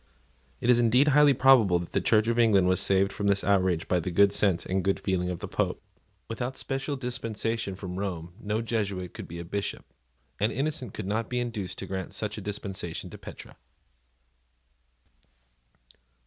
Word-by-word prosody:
It 125 - +4
is 120 - +4
indeed 125 +5 +4
highly 145 -1 +5
probable 120 -9 +5
that 85 0 -6
the - - 0
Church 110 0 +3
of 115 0 +1
England 100 -6 +4
was 95 0 +3
saved 95 0 +2
from 100 - -2
this 100 0 +2
outrage 95 -4 +2
by 90 - +2
the 85 - -3
good 100 +3 +4
sense 95 -5 +1
and 95 0 -1
good 95 0 +1
feeling 90 -2 -1
of 90 -2 -5
the - - -4
Pope. - - -1 0.5
Without 120 +3 -4
a - - -13
special 135 +2 -2
dispensation 115 -5 -3
from 95 -1 -6
Rome 90 -4 -4
no 105 +2 -2
Jesuit 100 -6 -2
could - - -8
be 85 - -8
a 85 - -6
Bishop; 100 +3 -4 0.5
and 105 +2 +2
Innocent 135 -4 -2
could - - -5
not 110 +3 -2
be 125 - -1
induced 110 -6 -4
to - - -5
grant 95 -1 -5
such 105 -1 -2
a 105 - -6
dispensation 95 -4 -5
to - - -10
Petre. - - -11
100 Hz, 185 wpm, -27 LUFS, 95-115 Hz, 0.5 s, highly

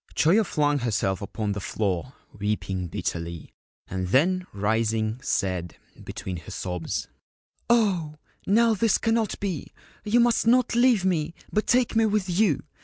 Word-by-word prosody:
Choyo 190 +9 +4
flung 145 -5 +1
herself 105 -6 -1
upon 105 +1 -3
the 100 - -3
floor, 100 +4 -2 0.2
weeping 100 -3 -2
bitterly, 85 0 -5 0.3
and 95 0 -3
then 180 - +2
rising, 110 +2 0
said, 95 - -2 0.3
between 95 -2 -6
her 80 - -11
sobs: 90 -3 -4 0.3
' - - -46
Oh, 190 -10 +2 0.3
now, 230 +3 +4
this 220 0 +2
cannot 225 -2 0
be! 185 -8 -4 0.3
You 225 +3 +2
must 235 -1 +3
not 250 +1 +4
leave 240 -5 +4
me, 170 -3 0 0.2
but 215 - +1
take 245 -1 +2
me 225 0 +4
with 210 -2 0
you. 180 -4 +2
150 Hz, 145 wpm, -25 LUFS, -, 0.3 s, Choyo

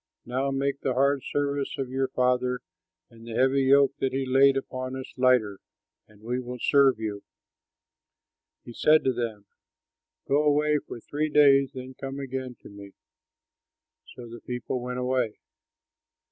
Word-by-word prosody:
Now 130 +3 -1
make 140 +1 -2
the 130 - -1
hard 140 +1 +2
service 145 0 -2
of 130 -2 -4
your 135 0 0
father 125 -1 0 0.5
and 115 -1 -16
the 115 - -6
heavy 135 +2 +2
yoke 140 0 +5
that 135 - -1
he 135 0 -1
laid 135 +1 +4
upon 130 -1 -5
us 130 0 -8
lighter, 125 -6 +2 0.5
and 105 -1 -21
we 125 +2 -2
will 125 0 -6
serve 135 -1 +4
you." 105 -2 -4 1.4
He 120 - -9
said 155 +5 +4
to 130 - +1
them, 115 -4 -4 0.8
"Go 140 +2 +3
away 150 0 +2
for 120 - -10
three 150 +6 -3
days; 140 -2 +4
then 130 0 -8
come 135 +1 -7
again 130 -2 -5
to - - -11
me." 100 -1 -12 1.2
So 120 - -10
the 115 0 -11
people 125 0 -4
went 125 0 -5
away. 125 -3 -1
130 Hz, 155 wpm, -26 LUFS, 125-140 Hz, 1.4 s, yoke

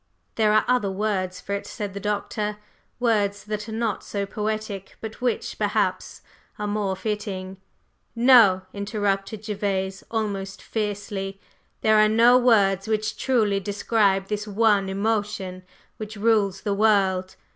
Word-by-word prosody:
'" - - -46
"There 215 -2 +3
are 215 0 +4
other 245 -5 +2
words 190 -2 -2
for 200 - -5
it," 200 - -3
said 205 -2 -5
the 200 - -5
Doctor. 210 +1 -2 0.4
"Words 205 -4 +1
that 210 +1 -5
are - - -6
not 220 -2 -2
so 200 -1 -3
poetic, 210 -1 -4
but 220 +2 -8
which, 250 -1 -2
perhaps, - - -1 0.3
are 210 - -3
more 205 -2 -1
fitting." 195 -3 -4 0.6
"No!" 230 -6 +6
interrupted 200 0 -2
Gervase, 195 -2 -2
almost 200 -4 -3
fiercely. 205 -2 -4 0.4
"There 215 0 +4
are 215 0 +5
no 230 +3 +6
words 200 -6 +3
which 215 0 -1
truly 215 -6 +1
describe 200 0 +1
this 210 +1 -3
one 205 -2 +2
emotion 200 -2 -2 0.4
which 215 0 -7
rules 200 -3 +2
the 205 - -1
world. 195 -3 +2
205 Hz, 140 wpm, -24 LUFS, 195-220 Hz, 0.6 s, No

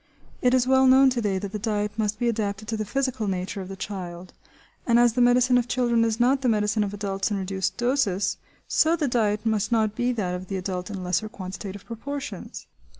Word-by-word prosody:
It 250 0 +4
is 250 -1 +3
well 265 0 +4
known 265 +1 +6
to 245 -1 -1
day 200 -3 0
that 195 0 -5
the 210 - -4
diet 210 0 -1
must 210 -1 -1
be 240 - 0
adapted 215 -2 -2
to 225 - -1
the 215 0 -3
physical 260 -1 -1
nature 190 +1 -3
of 185 - -8
the 195 - -6
child; 185 -2 -7 0.5
and 235 -1 +4
as 240 -1 +5
the 250 - +1
medicine 245 +1 +5
of 240 - -2
children 240 -2 +2
is 225 0 0
not 260 +3 +3
the 255 - +2
medicine 210 0 +1
of 200 - -3
adults 200 -1 -2
in 205 - -1
reduced 190 0 -2
doses, 240 -6 +1 0.3
so 320 +2 +3
the 305 -4 -1
diet 215 -3 0
must 220 0 0
not 220 -2 +2
be 245 +2 +1
that 195 -6 -2
of 180 +1 -5
the 195 - -3
adult 185 0 -4
in 195 -3 -5
lesser 180 +4 -1
quantitative 195 -2 -7
proportions. 275 +5 -6
215 Hz, 220 wpm, -25 LUFS, 195-245 Hz, 0.5 s, known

